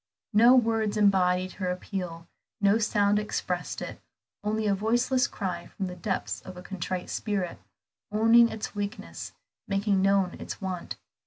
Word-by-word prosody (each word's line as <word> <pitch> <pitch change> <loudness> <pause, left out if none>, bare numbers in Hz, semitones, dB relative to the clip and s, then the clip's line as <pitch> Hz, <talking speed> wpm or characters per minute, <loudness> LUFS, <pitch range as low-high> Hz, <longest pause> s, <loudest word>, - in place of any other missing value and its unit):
No 235 +5 +7
words 225 -3 +2
embodied 185 -3 +3
her 185 -2 -3
appeal, 180 -2 -4 0.3
no 200 +2 +4
sound 205 -1 +3
expressed 180 -4 -3
it, - - -7 0.4
only 215 +1 0
a 205 - +3
voiceless 240 +6 +2
cry 180 -4 -4
from 195 - -5
the 180 -1 -5
depths 190 +2 -3
of 185 -1 -10
a 180 - -9
contrite 185 -1 -4
spirit, 195 -5 -2 0.5
owning 225 +2 +6
its 220 -2 -5
weakness, 205 -1 -5 0.3
making 195 -1 +1
known 195 -2 +3
its - - -6
want. 185 -3 -4
200 Hz, 145 wpm, -28 LUFS, 185-215 Hz, 0.5 s, No